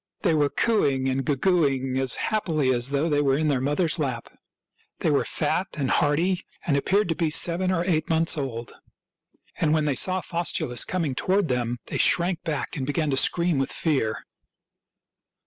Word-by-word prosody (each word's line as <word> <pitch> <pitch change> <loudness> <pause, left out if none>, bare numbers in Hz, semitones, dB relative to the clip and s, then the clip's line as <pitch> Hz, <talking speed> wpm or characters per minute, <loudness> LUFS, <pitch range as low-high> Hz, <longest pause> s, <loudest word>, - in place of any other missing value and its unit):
They 170 - +2
were 145 -2 +2
cooing 140 - +1
and 135 +1 -1
goo 145 +2 0
gooing 135 -6 +1
as 130 -2 +2
happily 155 -11 0
as 120 +1 0
though 140 +3 0
they 145 -2 +1
were 135 -1 +2
in 155 0 0
their 135 -3 0
mother's 150 +5 +1
lap. 130 -6 -3 0.7
They - - +1
were - - +2
fat 190 - -1
and 135 -3 -1
hearty 170 +5 +1 0.2
and 145 - +1
appeared 195 +9 +1
to 165 - 0
be 165 -1 0
seven 175 +4 +2
or 175 -2 0
eight 160 -4 0
months 165 0 +3
old; 125 -6 -5 0.9
and 155 -1 +2
when 155 -1 0
they 145 - +1
saw 185 +7 +2
Faustulus 165 -9 -1
com 185 -3 -2
ing 140 - -2
toward 185 +6 0
them 120 -1 -1
they - - -4
shrank 175 0 +2
back 160 0 -4
and 135 -3 -4
began 150 0 -1
to - - +1
scream 170 +1 +2
with 135 - -1
fear. 135 -9 -1
150 Hz, 185 wpm, -24 LUFS, 135-170 Hz, 0.9 s, months